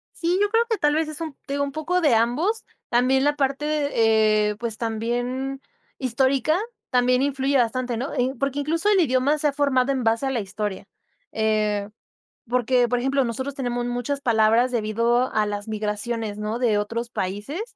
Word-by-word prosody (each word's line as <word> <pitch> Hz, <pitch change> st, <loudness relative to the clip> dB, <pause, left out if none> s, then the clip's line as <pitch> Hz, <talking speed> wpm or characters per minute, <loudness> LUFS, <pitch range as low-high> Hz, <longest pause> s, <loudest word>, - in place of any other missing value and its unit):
Sí, 345 Hz, +2 st, 0 dB
yo 410 Hz, -, +3 dB
creo 455 Hz, +2 st, +3 dB
que 445 Hz, -, +1 dB
tal 295 Hz, -4 st, +2 dB
vez, 320 Hz, 0 st, +1 dB
es 310 Hz, 0 st, -5 dB
un 320 Hz, -3 st, -4 dB
te 275 Hz, -, -5 dB
digo, 285 Hz, 0 st, 0 dB
un 280 Hz, -, -3 dB
poco 320 Hz, +5 st, -1 dB
de 290 Hz, -8 st, +4 dB
ambos. 280 Hz, -, +1 dB, 0.3 s
También 255 Hz, +2 st, +3 dB
la 290 Hz, +1 st, +2 dB
parte, 275 Hz, +1 st, -1 dB
de, 300 Hz, -1 st, 0 dB, 0.6 s
eh, -, -, -6 dB
pues, 230 Hz, -2 st, -3 dB
también 245 Hz, +4 st, -2 dB, 0.4 s
histórica, 265 Hz, +4 st, +1 dB, 0.3 s
también 250 Hz, 0 st, +3 dB
influye 275 Hz, 0 st, +1 dB
bastante, 245 Hz, 0 st, 0 dB
¿no?, 260 Hz, +4 st, -4 dB
eh, 255 Hz, +1 st, 0 dB
porque, 275 Hz, +1 st, -1 dB
incluso, 330 Hz, +7 st, 0 dB
el 405 Hz, -2 st, +4 dB
idioma 280 Hz, -1 st, +2 dB
se 300 Hz, -, +1 dB
ha 285 Hz, -, 0 dB
formado 275 Hz, -2 st, +2 dB
en 260 Hz, -2 st, -1 dB
base 225 Hz, +3 st, +1 dB
a 270 Hz, -, 0 dB
la 250 Hz, -, -1 dB
historia, 205 Hz, -1 st, -4 dB, 0.5 s
eh, 215 Hz, -2 st, 0 dB, 0.6 s
porque, 245 Hz, +1 st, +2 dB
por 245 Hz, +1 st, 0 dB
ejemplo, 270 Hz, +2 st, +1 dB
nosotros 260 Hz, +4 st, -4 dB
tenemos 245 Hz, -2 st, -2 dB
muchas 245 Hz, +3 st, -2 dB
palabras 230 Hz, +1 st, +3 dB
debido 235 Hz, +2 st, +1 dB
a 215 Hz, -1 st, +2 dB
las 205 Hz, 0 st, -4 dB
migraciones, 215 Hz, 0 st, -3 dB
¿no?, 210 Hz, +2 st, -3 dB
de 230 Hz, -4 st, +2 dB
otros 230 Hz, +3 st, -3 dB
países. 205 Hz, -, -4 dB
250 Hz, 185 wpm, -23 LUFS, 225-280 Hz, 0.6 s, de